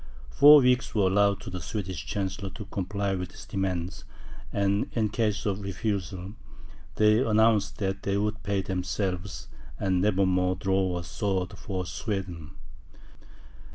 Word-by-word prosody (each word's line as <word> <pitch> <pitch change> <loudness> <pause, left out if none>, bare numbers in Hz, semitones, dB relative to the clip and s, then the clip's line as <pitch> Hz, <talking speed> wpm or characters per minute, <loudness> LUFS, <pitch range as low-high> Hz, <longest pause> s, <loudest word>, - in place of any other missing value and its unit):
Four 145 - +9
weeks 125 -2 +2
were 105 - +3
allowed 100 +1 +3
to - - -8
the 90 -1 -5
Swedish 95 -1 -5
Chancellor 95 0 -3
to 105 - -7
comply 100 +1 -2
with 90 -2 -3
these - - -12
demands; 95 -1 -3 0.5
and 100 0 +1
in 110 -3 +1
case 105 -1 -1
of 100 -1 -1
refusal, 100 -1 -3 0.6
they 105 +1 +4
announced 110 -3 +3
that 95 -1 -2
they 100 0 0
would 105 +1 -1
pay 100 -1 -1
themselves, 95 0 -3 0.3
and 95 -2 +1
never 100 -1 +3
more 90 0 +2
draw 95 -1 0
a 85 - -4
sword 95 -1 -2
for 95 -2 -4
Sweden. 90 -6 -4
100 Hz, 145 wpm, -27 LUFS, 95-105 Hz, 0.6 s, Four